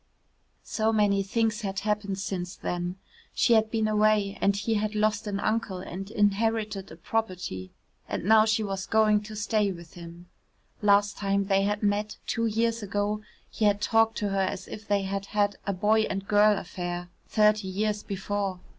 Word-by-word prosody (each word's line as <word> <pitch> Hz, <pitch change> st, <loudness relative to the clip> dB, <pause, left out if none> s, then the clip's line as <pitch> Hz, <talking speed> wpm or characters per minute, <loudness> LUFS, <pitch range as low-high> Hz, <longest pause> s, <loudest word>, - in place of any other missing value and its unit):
So 220 Hz, 0 st, 0 dB
many 205 Hz, -2 st, +3 dB
things 220 Hz, +3 st, 0 dB
had 195 Hz, -2 st, -3 dB
happened 205 Hz, -2 st, -1 dB
since 185 Hz, -2 st, -4 dB
then. 175 Hz, 0 st, -3 dB, 0.4 s
She 240 Hz, -, +4 dB
had 220 Hz, -1 st, +4 dB
been 220 Hz, -1 st, 0 dB
away 210 Hz, -2 st, +2 dB
and 200 Hz, 0 st, +3 dB
he 215 Hz, +3 st, -1 dB
had 215 Hz, 0 st, -1 dB
lost 215 Hz, 0 st, +1 dB
an 200 Hz, -1 st, -2 dB
uncle 215 Hz, -3 st, -1 dB
and 185 Hz, +2 st, -7 dB
inherited 210 Hz, -1 st, 0 dB
a -, -, -9 dB
property. 180 Hz, -, -3 dB, 0.4 s
And -, -, -3 dB
now 215 Hz, +1 st, +6 dB
she 220 Hz, 0 st, +1 dB
was 195 Hz, -2 st, -4 dB
going 215 Hz, -1 st, +4 dB
to 215 Hz, +1 st, -9 dB
stay 210 Hz, -1 st, +1 dB
with 170 Hz, -2 st, -10 dB
him. 170 Hz, 0 st, -11 dB, 0.6 s
Last 205 Hz, 0 st, +3 dB
time 200 Hz, 0 st, 0 dB
they 195 Hz, 0 st, +2 dB
had 210 Hz, +1 st, -1 dB
met, 205 Hz, +1 st, 0 dB
two 230 Hz, -1 st, 0 dB
years 230 Hz, +1 st, 0 dB
ago, 205 Hz, +1 st, -1 dB, 0.3 s
he 215 Hz, -, 0 dB
had 205 Hz, -1 st, +3 dB
talked 225 Hz, +1 st, +2 dB
to 205 Hz, -2 st, -1 dB
her 195 Hz, 0 st, 0 dB
as 185 Hz, 0 st, -2 dB
if 215 Hz, +1 st, -9 dB
they 200 Hz, -1 st, +1 dB
had 195 Hz, +1 st, -3 dB
had 205 Hz, -1 st, 0 dB
a 200 Hz, -, +1 dB
boy 215 Hz, +4 st, +2 dB
and 195 Hz, 0 st, -4 dB
girl 210 Hz, 0 st, +5 dB
affair 175 Hz, -1 st, -5 dB, 0.2 s
thirty 210 Hz, -2 st, +3 dB
years 210 Hz, +2 st, -1 dB
before. 195 Hz, -1 st, -3 dB
205 Hz, 180 wpm, -27 LUFS, 195-215 Hz, 0.6 s, now